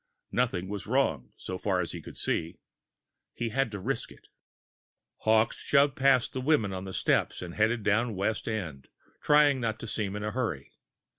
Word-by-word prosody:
Nothing 100 -8 0
was 100 +1 -5
wrong, 105 - +1
so 95 0 -6
far 95 -3 0
as 85 - -2
he 85 - -7
could - - -11
see. 80 +1 -1 0.8
He 120 - -2
had 135 +2 +1
to 105 - -5
risk - - -3
it. - - -17 0.9
Hawkes 110 +1 +2
shoved 140 -1 +3
past 135 -2 +3
the 130 - -2
women 130 -9 +2
on 95 0 -5
the 95 - -6
steps - - +1
and 85 -1 -7
headed 110 +2 +1
down 110 +2 +2
West 100 +3 -1
End, 85 -12 -4 0.3
trying 145 -3 +5
not 110 -2 -1
to - - -6
seem 105 -2 -3
in 105 - -4
a 105 - -2
hurry. 105 - -3
110 Hz, 180 wpm, -29 LUFS, 95-125 Hz, 0.9 s, trying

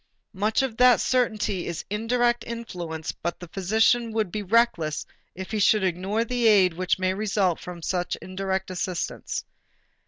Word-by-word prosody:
Much 215 +6 +1
of 240 -4 -3
that 250 -1 +6
certainly 215 -7 0
is 170 - -4
indirect 240 +3 +1
influence 175 -9 -5
but 170 +1 -5
the 175 - -9
physician 220 +5 +2
would 215 -4 -1
be 210 - -3
reckless 195 -7 +1 0.3
if 190 +2 -7
he 215 - -1
should 210 0 +4
ignore 190 +5 0
the 245 -1 +1
aid 195 -5 +5
which 185 +2 0
may 185 0 0
result 195 -3 0
from 175 -2 -9
such 180 0 -1
indirect 190 0 -3
assistance. 180 -1 -3
195 Hz, 155 wpm, -25 LUFS, 180-225 Hz, 0.3 s, that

